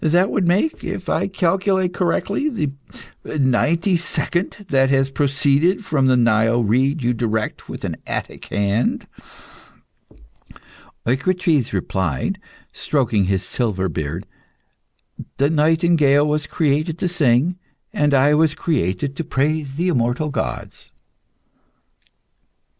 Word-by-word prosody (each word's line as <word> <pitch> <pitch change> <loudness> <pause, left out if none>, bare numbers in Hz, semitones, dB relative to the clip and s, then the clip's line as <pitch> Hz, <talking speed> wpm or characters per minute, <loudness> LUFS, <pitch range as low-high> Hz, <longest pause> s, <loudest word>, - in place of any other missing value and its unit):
That 175 +5 +3
would 180 - 0
make, 200 - +1
if - - -5
I - - +1
calculate 190 0 0
correctly, 200 - 0
the 155 - -2 0.7
ninety 165 +7 +2
second 175 +3 -3
that 135 -2 +3
has 135 0 +2
proceeded 145 +7 +1
from 140 -6 +1
the 130 -1 +4
Nile 115 0 +3
reed 130 +7 +1
you 120 +1 +2
direct 110 -2 -3
with - - -6
an - - -4
Attic - - -5
hand." 100 +3 0 2.0
Eucrites 155 - +1
replied, 90 -7 -2 0.3
stroking 120 -9 0
his 95 0 0
silver 95 -6 -1
beard 80 +4 -4 1.1
"The 140 +3 +2
nightingale 155 -2 +3
was 150 0 -1
created 155 +1 0
to 180 - -1
sing, 165 +1 +2 0.3
and 145 -1 +2
I 140 +2 +4
was 155 0 +3
created 135 - -1
to - - -2
praise 145 -1 -1
the 175 +4 0
immortal 130 +1 0
gods." - - -5
145 Hz, 115 wpm, -20 LUFS, 120-170 Hz, 2.0 s, the